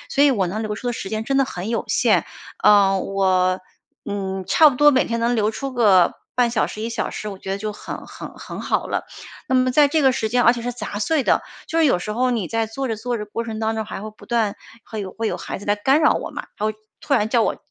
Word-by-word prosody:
所 285 +1 +4
以 280 - +5
我 195 -7 0
能 215 +5 -3
留 210 -1 -3
出 245 +3 -4
的 240 - 0
时 195 - -5
间 220 +1 -3
真 275 +2 0
的 275 - +4
很 185 -4 -6
有 230 - -1
限， - - +3 0.4
呃， 195 -2 +6
我 185 -1 +1 0.5
嗯， 195 -2 -3
差 310 -2 +6
不 255 - -3
多 295 +2 +7
每 260 -2 +3
天 230 0 -2
能 235 +1 +1
留 215 -1 +2
出 270 +4 -5
个 200 -8 +4 0.2
半 245 -1 +2
小 225 -2 +1
时、 215 - -7
1 230 - -3
小 230 - -2
时， - - -6
我 195 - -7
觉 190 - -7
得 195 - 0
就 215 +1 -4
很 - - -8
很 - - -9
很 - - -8
好 - - -1
了。 - - -2 0.4
那 260 - +1
么 255 0 +3
在 290 +3 +5
这 305 +1 +1
个 265 -1 +5
时 220 -2 -1
间， 245 +2 +2
而 235 - +6
且 240 - -5
是 245 +1 -3
杂 215 -3 -5
碎 300 +7 +1
的， - - +2 0.2
就 330 - -1
是 320 - +5
有 220 - +3
时 210 +4 -4
候 250 +3 +1
你 220 -7 -1
在 225 -1 0
做 265 +5 -4
着 225 -2 -2
做 240 +2 -3
着 210 - -4
过 230 +3 -4
程 220 -1 -5
当 220 0 -1
中， 220 - -2
还 200 - -6
会 215 - -6
不 215 - -17
断 225 -4 0 0.3
会 220 - -6
有 190 -2 -6
会 225 - -3
有 - - -2
孩 - - -5
子 205 - -11
来 205 - +2
干 265 +8 +2
扰 - - +6
我 - - -4
嘛， - - -7
他 210 - 0
会 215 - -1 0.3
突 280 - 0
然 215 -2 +1
叫 235 -3 +3
我 - - 0
225 Hz, 300 characters per minute, -21 LUFS, 205-250 Hz, 0.5 s, 多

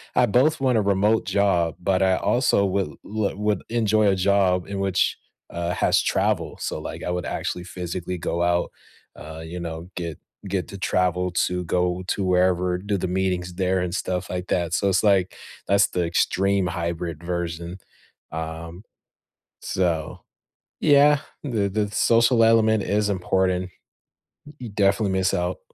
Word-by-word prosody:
I - - +5
both 135 +7 +2
want 130 -3 +2
a 110 - +3
remote 100 +3 +2
job, 90 -5 +1
but 95 +1 +1
I 95 -1 +3
also 120 -5 +2
would 95 0 0 0.2
l 105 -2 -2
would 105 -2 0
enjoy 110 -2 +2
a 95 - +3
job 95 -1 +2
in 100 - -5
which, 95 -1 +1 0.3
uh, 85 +1 -3
has - - +2
travel. - - 0
So, - - -3
like, - - -7
I - - -3
would 90 0 -2
actually 90 - -3
physically 90 0 -5
go 85 0 -1
out, 85 0 +1 0.5
uh, 80 +1 -9
you 90 +2 -6
know, 85 0 -6
get 85 -4 -5 0.3
get 95 -1 -2
to 100 - -8
travel 90 -1 0 0.2
to 90 0 -3
go 90 +1 0
to 100 - -1
wherever; 90 0 +2
do 100 +2 -2
the 90 - -2
meetings 90 -1 -1
there 95 0 +1
and 90 +1 -2
stuff 90 0 -3
like 90 0 -3
that. 85 -1 -1
So 100 - +1
it's 95 -1 +2
like, 95 -3 +3 0.3
that's 100 +1 +4
the 90 -1 -1
extreme 95 +2 +1
hybrid 85 -1 -4
version. 85 0 -4 0.5
Um, 80 +3 -6 0.8
so, 85 -4 -2 0.6
yeah, 145 -1 +5 0.2
the 110 -7 0
the 105 +1 -1
social 115 +1 +4
element 110 -2 +4
is 105 0 0
important. 95 0 0 0.8
Y 150 - -13
you 120 - -6
definitely 100 0 +1
miss 95 0 +1
out. 90 +1 -1
95 Hz, 160 wpm, -23 LUFS, 90-100 Hz, 0.8 s, I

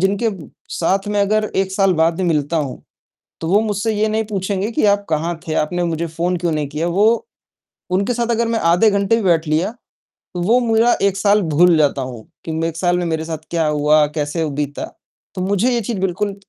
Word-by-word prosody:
जिनके 200 +4 +1 0.4
साथ 195 +4 0
में 205 0 -1
अगर 215 +2 +2
1 190 0 0
साल 195 -1 +3
बाद 165 +1 +3
भी 190 - -2
मिलता 160 -2 0
हूँ, 140 -5 -2 0.7
तो 160 - -3
वो 205 - +6
मुझसे 215 0 -1
ये 215 +1 +1
नहीं 220 +1 0
पूछेंगे 200 +1 -2
कि 220 - +1
आप 200 0 +2
कहाँ 165 +2 -1
थे, 155 - -2
आपने 175 +4 0
मुझे 170 0 -2
फ़ोन 175 +3 -2
क्यों 170 -1 -1
नहीं 150 -2 -1
किया? 155 +3 -2
वो 215 - +2 0.6
उनके 195 +6 +1
साथ 235 0 -1
अगर 235 0 0
मैं 230 -1 0
आधे 215 +5 +4
घंटे 200 +2 +2
भी 230 - -1
बैठ 170 -4 +2
लिया, 160 +7 +1 0.6
तो 175 - -3
वो 230 +8 +3
मेरा 230 +2 +4
1 195 -1 +2
साल 205 +1 +3
भूल 165 +1 +4
जाता 145 -2 +2
हूँ 125 -4 -7 0.2
कि 160 -1 -3
1 165 0 -5
साल 175 0 +1
में 175 - -1
मेरे 160 -1 -2
साथ 160 -1 -6
क्या 165 -2 +1
हुआ, 150 0 +3
कैसे 150 +2 -1
ह 155 - -1
बीता। 145 0 -3 0.5
तो 185 - -3
मुझे 205 +6 +1
ये 235 - 0
चीज़ 210 -2 -3
बिल्कुल 195 +2 -1
180 Hz, 220 wpm, -19 LUFS, 160-205 Hz, 0.7 s, वो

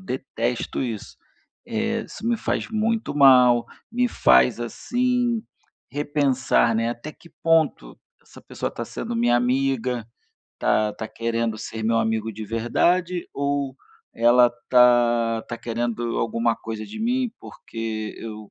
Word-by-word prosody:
detesto 125 -6 -3
isso. 115 -5 -5 0.5
Eh, 225 -1 -1
isso 220 - -10
me 235 - +2
faz - - -2
muito 220 -4 -1
mal, 125 -4 +6 0.3
me 245 0 +1
faz, 65 - +4
assim, 245 - 0 0.5
repensar, 140 -4 +1
né: 115 +1 +1
"Até 120 +6 -7
que 170 - -19
ponto 160 - +1 0.2
essa - - -16
pessoa - - -4
está - - -6
sendo 120 - -5
minha 120 +1 +3
amiga. 125 -2 0 0.5
Está 110 0 +1
está 110 +1 -7
querendo 115 -1 -2
ser 110 0 -6
meu 115 0 +2
amigo 110 0 -1
de 110 +1 -7
verdade 170 - 0
ou 140 -1 -1 0.4
ela 120 +1 +5
está 120 -2 +3
está 120 - -6
querendo 120 0 -2
alguma 115 0 0
coisa 110 -1 -6
de 105 - -8
mim, 245 +1 0
porque 110 -1 -6
eu 110 -2 -8
120 Hz, 135 wpm, -23 LUFS, 115-150 Hz, 0.5 s, mal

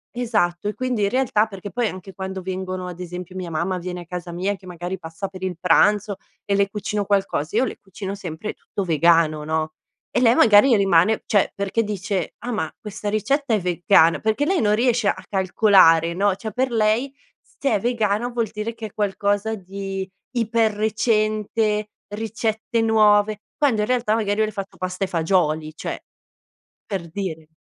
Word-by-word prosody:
Esatto, 205 -6 0
e 210 - -2
quindi 255 -4 -1
in 200 - +2
realtà 230 -4 +2
perché 195 -1 -8
poi 240 -2 0
anche 185 0 -8
quando 190 0 -5
vengono 185 0 -4
ad 180 -1 -7
esempio 180 +1 -7
mia 180 -2 -5
mamma 175 +3 -1
viene 180 0 -5
a - - -11
casa 175 0 -6
mia 190 +4 -1
che 190 -1 -16
magari 175 +1 -5
passa 165 +3 -6
per 190 -1 -11
il 185 -3 -3
pranzo 200 +3 +3 0.3
e 200 - 0
le 200 0 +2
cucino 210 0 -2
qualcosa, 195 -5 -1
io 235 - +4
le - - -6
cucino 195 0 -7
sempre 190 +1 -6
tutto 200 - -5
vegano, 165 -2 +3
no, 155 0 -2 0.4
e - - +1
lei 235 0 +5
magari 225 +3 +6
rimane 195 +2 +3
cioè 205 -2 +2
perché 200 +3 0
dice: 195 -4 -3
"Ah 245 - -2
ma 190 -9 -2
questa 210 -2 -5
ricetta 260 +4 +1
è 210 - +1
vegana?" 170 -2 +3
Perché 220 +6 0
lei 375 +1 +1
non 210 -1 +3
riesce 235 -2 +2
a - - 0
calcolare, 185 -4 +4
no, 195 +2 +1
cioè 220 +2 -6
per 260 +4 0
lei 225 +4 +1 0.3
s - - -31
se 275 - +1
è 210 - +2
vegano 230 0 0
vuol 235 -3 -2
dire 220 +2 -4
che 220 -2 -6
è - - -18
qualcosa 205 +1 0
di 195 0 -5 0.3
iper 225 -1 +2
recente, 215 0 0 0.2
ricette 220 +1 -2
nuove 215 -1 +4 0.2
quando 260 -8 +2
in 210 - 0
realtà 245 -4 +1
magari 210 -2 0
io 220 - +3
le 215 - -5
ho - - -22
fatto 195 -1 -6
pasta 185 +1 -2
e - - -7
fagioli, 160 -3 0
cioè - - -5 0.8
per 185 -5 -4
dire, 160 -5 -5
200 Hz, 185 wpm, -22 LUFS, 180-220 Hz, 0.8 s, magari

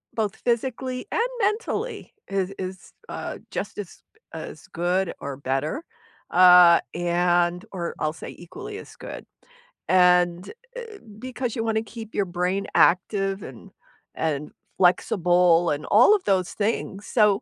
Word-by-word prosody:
both 215 -3 -1
physically 255 +1 -2
and 465 +2 +1
mentally 430 +2 -2
is 195 -1 -1
is, 185 0 -7 0.2
uh, - - -5
just - - -4
as - - -8 0.3
as - - -8
good 180 +2 0
or 140 -1 -5
better, 140 - -2 0.5
uh, 180 -1 +8 0.2
and 175 0 +1
or 175 -3 -4
I'll 155 0 -1
say 160 - -9
equally 405 - -9
as - - -13
good, - - -8 0.6
and, 180 0 +4 0.2
eh, 460 -4 -8 0.2
because 250 -1 -4
you 225 - -1
wanna 220 -1 0
keep 225 -1 -8
your 200 - +1
brain 185 +3 0
active 195 +2 +3
and 130 -3 -11 0.4
and 150 -2 -2 0.3
flexible 175 -1 +3
and 145 +1 -3
all 245 - +6
of 400 - -3
those 185 -2 +1
things, 205 -1 -2
so 210 0 +3
185 Hz, 135 wpm, -24 LUFS, 175-225 Hz, 0.6 s, uh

